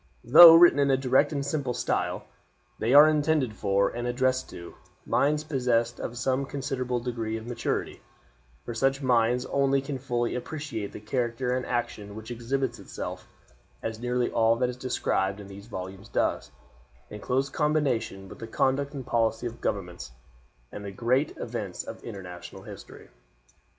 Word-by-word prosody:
Though 165 +7 +10
written 170 -3 +7
in 140 -1 +3
a 135 - +4
direct 135 +3 +2
and 140 -2 -2
simple 140 -4 -2
style, - - -1 0.6
they 115 - 0
are 145 +3 +9
intended 150 -5 +1
for, 100 -1 +1
and 120 +1 -4
addressed 130 +1 0
to, 85 0 -10 0.3
minds 150 +2 +1
possessed 125 -5 0
of 120 - -5
some 130 +2 0
considerable 130 -3 -3
degree 115 -2 -3
of 110 - -9
maturity, 120 -1 -3 0.6
for 120 - -5
such 135 +4 0
minds 125 0 +2
only 140 0 +2
can 135 0 -5
fully 120 -2 -1
appreciate 125 -3 -5
the - - -8
character 125 +3 -1
and 130 - -3
action 105 -4 -3
which 110 +2 -8
exhibits 120 +1 -2
itself, - - -7 0.6
as 110 0 -4
nearly 125 0 -1
all 115 0 +3
that 125 +1 0
is 125 - -5
described 105 -6 -1
in 100 - -9
these 100 +2 -11
volumes 95 0 -8
does, - - -1 0.6
in 105 - -7
close 135 +2 0
combination 135 -10 -1
with - - -12
the 115 - -7
conduct 140 +5 0
and 135 -3 -6
policy 115 0 0
of 120 0 -6
governments, 90 -10 -4 0.6
and 105 - -8
the 100 - -5
great 120 +8 0
events - - -5
of - - -9
international 90 -3 -9
history. - - -12
125 Hz, 160 wpm, -27 LUFS, 115-135 Hz, 0.6 s, Though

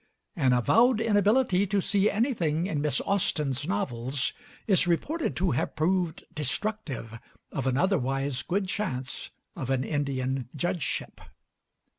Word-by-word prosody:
An 135 -8 +3
avowed 225 - +4
inability 205 -2 +3
to 200 +1 +1
see 200 +2 +2
anything 180 - 0
in 160 -7 -1
Miss 150 -1 +1
Austen's 150 -8 0
novels 135 - -1 0.3
is 190 -5 +4
reported 295 - 0
to 180 -1 +1
have 125 - -1
proved 170 +1 0
destructive 150 - -3 0.3
of 135 -1 -2
an 130 0 +1
otherwise 135 -6 +1
good 195 +2 -1
chance 130 -11 -3 0.3
of 130 - -5
an 130 -1 +1
Indian 135 -3 -2
judgeship. 175 +1 -2
165 Hz, 125 wpm, -28 LUFS, 135-200 Hz, 0.3 s, avowed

